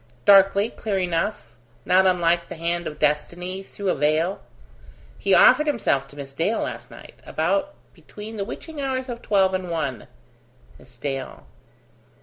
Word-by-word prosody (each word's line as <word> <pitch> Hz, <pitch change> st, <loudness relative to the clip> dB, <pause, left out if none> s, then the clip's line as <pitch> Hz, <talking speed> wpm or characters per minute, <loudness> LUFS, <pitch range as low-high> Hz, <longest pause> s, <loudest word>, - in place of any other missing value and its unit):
"Darkly: 200 Hz, +2 st, +6 dB
clear 205 Hz, -3 st, -3 dB
enough: 180 Hz, +3 st, -1 dB, 0.4 s
not 190 Hz, +1 st, +4 dB
unlike 170 Hz, -2 st, +2 dB
the -, -, -6 dB
hand 170 Hz, +1 st, -2 dB
of 150 Hz, -, -7 dB
destiny 175 Hz, +5 st, -1 dB
through 195 Hz, 0 st, -5 dB
a -, -, +3 dB
veil. 155 Hz, +6 st, 0 dB, 0.8 s
He -, -, +3 dB
offered 310 Hz, -12 st, +6 dB
himself 170 Hz, -, +1 dB
to 140 Hz, -, -17 dB
Miss 140 Hz, -1 st, -8 dB
Dale 170 Hz, +10 st, 0 dB
last -, -, -5 dB
night, -, -, -14 dB
about 195 Hz, -, -1 dB, 0.2 s
between 215 Hz, +2 st, -10 dB
the 200 Hz, -, -2 dB
witching 310 Hz, +7 st, -7 dB
hours 260 Hz, -1 st, -2 dB
of 235 Hz, -1 st, -6 dB
twelve 190 Hz, -2 st, +2 dB
and 185 Hz, -1 st, -2 dB
one." 150 Hz, -7 st, -3 dB, 0.7 s
"Miss -, -, -17 dB
Dale 135 Hz, -2 st, -5 dB
185 Hz, 150 wpm, -23 LUFS, 160-205 Hz, 0.8 s, Darkly